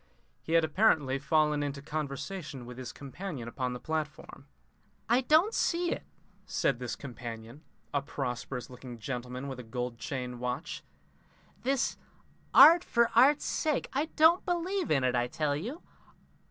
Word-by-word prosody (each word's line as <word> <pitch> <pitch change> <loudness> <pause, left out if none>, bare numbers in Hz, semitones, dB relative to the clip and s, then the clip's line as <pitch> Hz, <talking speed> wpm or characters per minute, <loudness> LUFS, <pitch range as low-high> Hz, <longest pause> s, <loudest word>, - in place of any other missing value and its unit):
He 160 - -4
had 165 -1 +5
apparently 155 -6 +2
fallen 150 +1 +2
into 140 -1 -3
conversation 145 0 -5
with 125 +1 -9
his 125 -2 -6
companion 140 -2 -7
upon 125 +1 -3
the 125 - -6
platform. 150 -2 -5 0.6
"I 240 +3 +4
don't 315 - +4
see 345 0 +1
it," - - -2 0.5
said 130 -3 0
this 125 -2 -4
companion, 120 0 -8 0.3
a 140 - +2
prosperous 125 -2 -4
looking 125 -1 -10
gentleman 125 +2 -5
with 135 -2 -6
a - - -4
gold 125 +1 -4
watch 115 - -23 0.8
chain. - - -29 0.8
"This 270 +1 0 0.5
art 340 +2 +9
for 235 -1 +2
art's 275 +5 +5
sake 305 -3 0
I 280 +3 +1
don't 325 +3 +6
believe 355 +1 -1
in 135 -3 +2
it, 125 - +2
I 120 0 +1
tell 145 +2 -1
you. 235 - -5
145 Hz, 150 wpm, -30 LUFS, -, 0.8 s, art